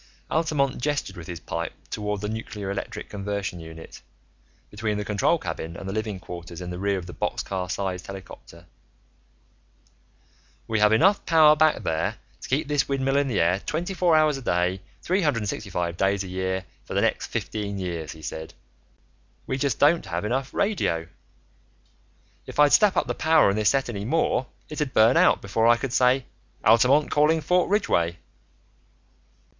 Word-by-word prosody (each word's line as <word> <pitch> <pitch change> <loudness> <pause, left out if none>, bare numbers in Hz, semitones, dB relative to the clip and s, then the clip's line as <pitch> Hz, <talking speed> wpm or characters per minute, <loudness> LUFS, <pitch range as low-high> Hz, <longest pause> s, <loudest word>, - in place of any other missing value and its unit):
Altamont 150 -5 0
gestured 145 +1 -2
with 85 -1 -9
his 85 -2 -6
pipe 85 +1 -4 0.2
toward 105 -1 -3
the 105 - -2
nuclear 105 -2 -5
electric 100 - -5
conversion 100 -3 -4
unit, 80 0 -11 0.7
between 105 0 -2
the 105 - -3
control 105 -1 +2
cabin 85 +1 -6
and 95 - -8
the 95 - -3
living 110 -3 -3
quarters 85 -1 -9
in 90 -1 -6
the 90 - -6
rear 100 0 0
of 90 - -6
the 90 - -9
boxcar 95 -2 -3
sized 90 -1 -3
helicopter. 85 -4 -11 2.0
"We 110 -1 0
have 105 0 +5
enough 190 - +4
power 155 -2 +6
back 155 0 +3
there 80 0 -1 0.3
to - - -9
keep 145 +4 0
this 145 -2 0
windmill 135 0 0
in 140 0 +2
the 120 -6 0
air 90 +3 +2
twenty 175 - -3
four 175 -3 +3
hours 155 -2 +3
a - - -10
day, 90 -3 0 0.2
three 185 +3 +1
hundred 140 -9 +1
and 105 - -2
sixty 105 - -5
five 85 -2 -2
days 100 +1 +1
a - - -7
year, 95 0 -2 0.2
for - - -7
the - - +3
next - - 0
fifteen 100 -2 -4
years," 85 -4 -4
he 80 -1 -14
said. 80 +1 -6 0.9
"We 130 - -2
just 135 -3 0
don't 155 +4 +3
have 85 +4 -3
enough 130 +4 -1
radio. 85 - -1 1.4
If - - -9
I'd 145 -1 +5
step 210 -3 +5
up - - +2
the - - -2
power 160 -9 +4
on - - -2
this 105 -1 +3
set 135 -1 +1
any 105 -4 -4
more, 135 -2 +1 0.2
it'd 150 -3 -4
burn 115 +4 +6
out - - +4
before 110 +3 +1
I 120 0 +6
could 125 0 -4
say, 125 +1 +3 0.4
'Altamont 125 +7 +5
calling 155 +2 +3
Fort 180 +4 +1
Ridgeway.'" 85 - +1
105 Hz, 180 wpm, -25 LUFS, 90-145 Hz, 2.0 s, power